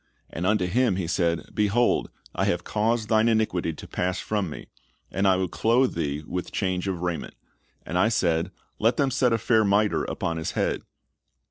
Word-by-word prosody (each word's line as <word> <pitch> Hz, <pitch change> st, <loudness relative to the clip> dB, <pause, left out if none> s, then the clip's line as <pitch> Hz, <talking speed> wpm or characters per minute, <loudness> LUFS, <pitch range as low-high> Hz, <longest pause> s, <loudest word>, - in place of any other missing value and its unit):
And 85 Hz, +3 st, -2 dB
unto 105 Hz, -3 st, +2 dB
him 115 Hz, +3 st, +2 dB
he 95 Hz, -2 st, -2 dB
said, 85 Hz, -1 st, -1 dB
Behold, 105 Hz, +3 st, +2 dB, 0.2 s
I -, -, 0 dB
have 85 Hz, 0 st, 0 dB
caused 110 Hz, +2 st, 0 dB
thine 110 Hz, +1 st, +3 dB
iniquity 110 Hz, -7 st, +1 dB
to -, -, -10 dB
pass 90 Hz, +1 st, -2 dB
from 105 Hz, -5 st, -2 dB
thee, 75 Hz, -, -8 dB, 0.5 s
and 100 Hz, +2 st, +1 dB
I 95 Hz, -, +5 dB
will 95 Hz, 0 st, 0 dB
clothe 120 Hz, +8 st, +2 dB
thee 75 Hz, -2 st, -2 dB
with 90 Hz, +1 st, -4 dB
change 95 Hz, -1 st, -1 dB
of 90 Hz, -3 st, -2 dB
raiment. 90 Hz, -2 st, -3 dB, 0.5 s
And 90 Hz, -, -1 dB
I 110 Hz, -, +4 dB
said, 85 Hz, -6 st, +1 dB, 0.3 s
Let 115 Hz, +3 st, +2 dB
them 140 Hz, -2 st, +2 dB
set 125 Hz, -1 st, +2 dB
a 115 Hz, -, +3 dB
fair 110 Hz, 0 st, +3 dB
miter, 105 Hz, +1 st, +2 dB
upon 85 Hz, 0 st, -3 dB
his 80 Hz, -, -3 dB
head. -, -, 0 dB
95 Hz, 190 wpm, -25 LUFS, 90-110 Hz, 0.5 s, I